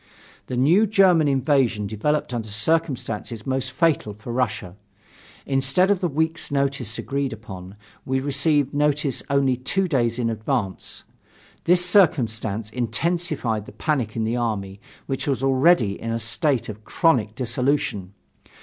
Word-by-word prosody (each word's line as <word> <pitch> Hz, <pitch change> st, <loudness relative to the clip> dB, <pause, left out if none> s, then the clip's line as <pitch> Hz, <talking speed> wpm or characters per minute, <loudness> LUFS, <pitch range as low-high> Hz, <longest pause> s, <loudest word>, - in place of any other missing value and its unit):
The 125 Hz, -, -3 dB
new 170 Hz, -, +4 dB
German 185 Hz, -6 st, +4 dB
invasion 135 Hz, -5 st, +1 dB
developed 125 Hz, +7 st, -1 dB
under 115 Hz, -2 st, -3 dB
circumstances 115 Hz, -3 st, -1 dB
most 130 Hz, 0 st, -2 dB
fatal 135 Hz, -7 st, +1 dB
for 105 Hz, +3 st, -7 dB
Russia. 110 Hz, -7 st, -2 dB, 0.7 s
Instead 135 Hz, +8 st, +2 dB
of 200 Hz, -, +2 dB
the 180 Hz, -, 0 dB
week's 160 Hz, +2 st, -1 dB
notice 140 Hz, -5 st, -1 dB
agreed 140 Hz, -1 st, -2 dB
upon, 95 Hz, -4 st, -9 dB, 0.3 s
we 130 Hz, 0 st, -1 dB
received 145 Hz, +1 st, +1 dB
notice 145 Hz, -2 st, +1 dB
only 140 Hz, -2 st, +2 dB
two 185 Hz, +10 st, 0 dB
days 120 Hz, -7 st, 0 dB
in 115 Hz, -2 st, 0 dB
advance. 110 Hz, -3 st, -3 dB, 0.6 s
This 180 Hz, +1 st, +4 dB
circumstance 115 Hz, -, +1 dB
intensified 125 Hz, -, -1 dB
the -, -, -11 dB
panic 130 Hz, -9 st, -1 dB
in 115 Hz, -, -1 dB
the 115 Hz, +2 st, -1 dB
army 100 Hz, -5 st, -3 dB, 0.3 s
which 135 Hz, +1 st, -3 dB
was 135 Hz, -2 st, -1 dB
already 135 Hz, -, +3 dB
in 115 Hz, 0 st, -2 dB
state 115 Hz, +4 st, 0 dB
of 110 Hz, 0 st, -8 dB
chronic 115 Hz, -, +1 dB
dissolution. 120 Hz, -6 st, -1 dB
130 Hz, 135 wpm, -23 LUFS, 110-150 Hz, 0.7 s, new